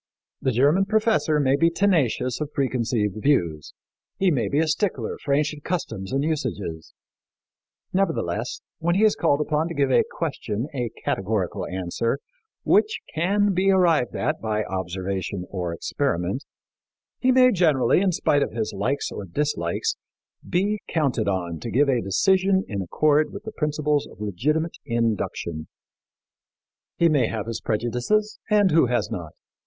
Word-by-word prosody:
The 130 - +1
German 145 - +3
professor 215 -7 +2
may 135 -1 +3
be 165 +4 +3
tenacious 155 - +1
of 150 - -3
preconceived 115 -6 0
views; 85 - 0 0.4
he 190 -2 +3
may 120 -9 +1
be 140 - -1
a 160 +1 +3
stickler 155 - -1
for 140 - -2
ancient 150 +1 0
customs 135 - -3
and 135 +1 0
usages; 115 - -3 1.0
nevertheless, 195 +1 -1 0.2
when 170 +1 +1
he 205 - +3
is 215 -1 +5
called 150 -3 +2
upon 150 +1 0
to 170 - -6
give 140 -2 +2
a - - +5
question 125 -7 -3
a 125 -4 -2 0.2
categorical 95 -1 -1
answer 95 +8 -2 0.5
which 435 - +3 0.2
can 200 +5 +2
be 190 +2 +2
arrived 175 -9 +3
at - - -1
by 110 -1 -1
observation 95 0 -3
or 90 -3 -3
experiment, 95 - -2 0.7
he 255 - +3
may 255 0 +6
generally, 160 - +3
in 195 -2 +2
spite 145 -3 +2
of - - -1
his 110 -2 -2
likes 140 +1 -1
or 100 - -6
dislikes, 85 - -1 0.5
be 205 +4 +1
counted 135 -9 0
on 90 -4 -2
to 120 - -5
give 140 +4 +3
a 125 -3 +2
decision 190 - +2
in 100 -3 -3
accord 150 - +2
with 200 +1 -8
the 220 - -6
principles 150 -4 0
of - - -16
legitimate 150 - -1
induction. 110 - -2 1.3
He 170 - +4
may 145 -8 +3
have 110 -3 -3
his 115 -1 -4
prejudices 125 - 0
and 205 -3 +4
who 160 -5 +5
has 120 -6 0
not? 85 -4 -5
140 Hz, 150 wpm, -24 LUFS, 105-170 Hz, 1.3 s, may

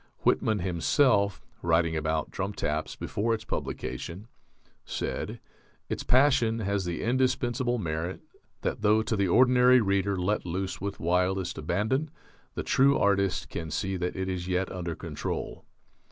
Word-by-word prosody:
Whitman 110 -1 +2
himself, 100 - +2 0.2
writing 85 -1 +2
about 80 0 -1
"Drum 95 +2 -3
Taps" 75 -4 -2
before 115 +3 -1
its 110 - -9
publication, 85 - -5 0.6
said, - - -4 0.5
"Its - - -2
passion 125 -4 +3
has 100 -3 -1
the 85 -1 -3
indispensable 125 0 +1
merit 85 -2 -3 0.4
that - - -2
though 110 +1 +4
to 110 - -1
the 100 -2 +1
ordinary 125 +4 +6
reader 100 -2 +1
let 95 +4 0
loose 95 +2 -3
with 100 +1 -4
wildest 90 +1 0
abandon, 110 - 0 0.5
the - - -2
true 135 +2 +4
artist 100 -3 +1
can 80 -1 -5
see 95 +5 -2
that 90 -1 -2
it 95 0 -2
is 90 -1 -3
yet 95 0 0
under 85 -3 -4
control." - - -5
95 Hz, 140 wpm, -28 LUFS, 90-115 Hz, 0.6 s, ordinary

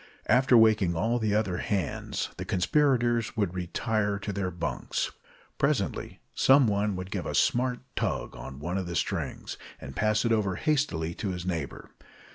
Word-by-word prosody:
After 125 +1 +5
waking 110 -6 +4
all 115 +8 +1
the 105 -2 +1
other 100 -5 +1
hands, 95 -5 -2
the - - -4
conspirators 120 +1 +2
would 100 -5 0
retire 100 +3 -1
to 100 0 -4
their 95 -1 -1
bunks. 90 -1 -3 0.5
Presently 140 -8 -1
some 135 0 +5
one 105 -1 +1
would 90 +1 -6
give - - -3
a - - -3
smart 125 0 +2
tug - - -2
on 65 - -8
one 85 +6 -2
of 95 - -4
the 85 - -4
strings, - - -2 0.2
and 70 0 -9
pass 110 +2 +2
it 115 - +2
over 105 -4 +1
hastily 110 - 0
to 100 - -4
his 90 -1 -4
neighbor. 85 -6 -4
105 Hz, 165 wpm, -28 LUFS, 90-120 Hz, 0.5 s, After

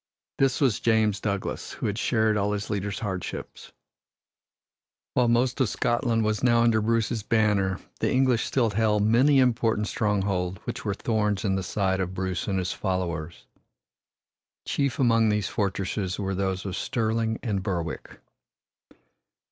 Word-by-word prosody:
This 135 -2 +2
was 130 -7 +2
James 110 -3 +2
Douglas, 100 -2 -3
who - - -5
had 105 +1 -1
shared 110 -3 +2
all 105 0 0
his 105 +1 -4
leader's 100 -1 -3
hardships. 95 -5 -5 1.4
While 125 -1 +3
most 120 +2 +2
of 125 - +2
Scotland 120 -2 0
was 110 0 0
now 120 -2 +4
under 115 -2 +3
Bruce's 115 0 0
banner, 105 -3 +1 0.2
the - - +1
English 130 -3 +2
still 120 -5 +1
held 105 0 +2
many 125 +7 +4
important 115 -4 +2
strongholds 95 -4 -1
which 120 0 -5
were 100 -3 -1
thorns 105 -1 0
in 95 - +1
the 95 - 0
side 95 -1 -1
of 95 0 -3
Bruce 95 -1 -2
and 100 -2 0
his 90 -1 -1
followers. 85 -4 -3 1.2
Chief 140 -3 -1
among 115 -3 +3
these 105 -2 0
fortresses 95 -2 -2
were 95 -1 -2
those 95 0 -2
of 95 -2 -3
Stirling 110 -1 -1
and 105 -6 -1
Berwick. 85 -4 -4
105 Hz, 150 wpm, -26 LUFS, 95-115 Hz, 1.4 s, now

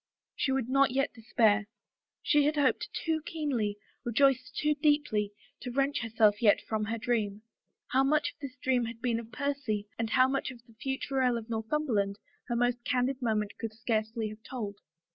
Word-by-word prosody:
She 270 - 0
would 265 -3 0
not 275 +1 +4
yet 270 +2 0
despair. 220 -2 +2 0.6
She 295 -2 +4
had 300 +1 +2
hoped 285 -3 +2
too 320 -1 -1
keenly, 255 -12 -1 0.3
rejoiced 260 +2 +2
too 300 0 +2
deeply, 290 -9 +1 0.3
to 250 - -6
wrench 275 +3 +1
herself 220 -2 +3
yet 210 -3 +5
from 215 -1 -1
her 225 +2 -2
dream. 215 -3 -1 0.5
How 265 +1 +3
much 300 +2 +2
of - - -45
this 275 -3 -7
dream 250 -2 +2
had 230 0 -7
been 235 -1 0
of 230 0 -10
Percy 275 -8 -2
and 225 -1 -1
how 255 +3 +5
much 270 0 -1
of 240 -2 -11
the 230 - -19
future 265 +3 -2
Earl 250 -2 +3
of 230 0 -7
Northumberland 220 -4 0 0.3
her 240 - -1
most 245 0 +1
candid 255 +2 0
moment 215 -3 0
could 225 -2 -4
scarcely 220 0 -1
have 215 +1 -10
told. 215 -5 -5
240 Hz, 180 wpm, -30 LUFS, 220-270 Hz, 0.6 s, yet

